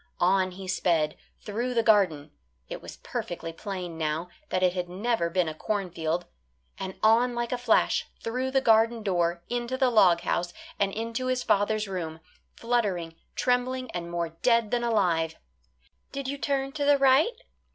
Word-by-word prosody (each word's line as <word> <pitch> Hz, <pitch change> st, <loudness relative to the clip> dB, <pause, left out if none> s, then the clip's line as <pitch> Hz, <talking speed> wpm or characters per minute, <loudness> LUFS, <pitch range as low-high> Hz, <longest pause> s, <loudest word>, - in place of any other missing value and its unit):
On 185 Hz, +1 st, +3 dB
he 190 Hz, +1 st, -9 dB
sped, 170 Hz, -4 st, +1 dB, 0.3 s
through 240 Hz, +4 st, -3 dB
the 230 Hz, -, +3 dB
garden; 180 Hz, -10 st, +3 dB, 0.4 s
it -, -, -6 dB
was -, -, -10 dB
perfectly 165 Hz, -1 st, -5 dB
plain 180 Hz, -2 st, -6 dB
now 160 Hz, +2 st, -1 dB, 0.2 s
that 185 Hz, -, 0 dB
it 180 Hz, -1 st, +4 dB
had 180 Hz, -1 st, -3 dB
never 195 Hz, -1 st, 0 dB
been 180 Hz, 0 st, +1 dB
a 155 Hz, -, -3 dB
cornfield, 175 Hz, -2 st, -2 dB, 0.5 s
and 190 Hz, 0 st, -5 dB
on 235 Hz, +3 st, +4 dB
like 240 Hz, 0 st, -2 dB
a 250 Hz, -, 0 dB
flash 245 Hz, -, +2 dB
through 255 Hz, +3 st, -2 dB
the 265 Hz, 0 st, +2 dB
garden 225 Hz, -1 st, +4 dB
door 175 Hz, -3 st, 0 dB
into 240 Hz, +1 st, -2 dB
the 260 Hz, -2 st, +3 dB
log 180 Hz, -7 st, +5 dB
house, 175 Hz, 0 st, -1 dB, 0.3 s
and 195 Hz, -1 st, +2 dB
into 230 Hz, +4 st, -3 dB
his 255 Hz, -1 st, 0 dB
father's 210 Hz, +1 st, +1 dB
room 165 Hz, -4 st, -4 dB, 0.4 s
fluttering, 205 Hz, -9 st, -1 dB, 0.2 s
trembling, 255 Hz, 0 st, 0 dB
and 170 Hz, -1 st, -5 dB
more 170 Hz, -1 st, -2 dB
dead 230 Hz, +6 st, +1 dB
than 240 Hz, -1 st, +1 dB
alive. 175 Hz, -8 st, +1 dB, 0.8 s
"Did 275 Hz, -1 st, -4 dB
you 280 Hz, +1 st, -3 dB
turn 275 Hz, -1 st, -1 dB
to 290 Hz, +1 st, -3 dB
the 285 Hz, 0 st, +5 dB
right?" 275 Hz, -, +4 dB
205 Hz, 165 wpm, -27 LUFS, 175-245 Hz, 0.8 s, log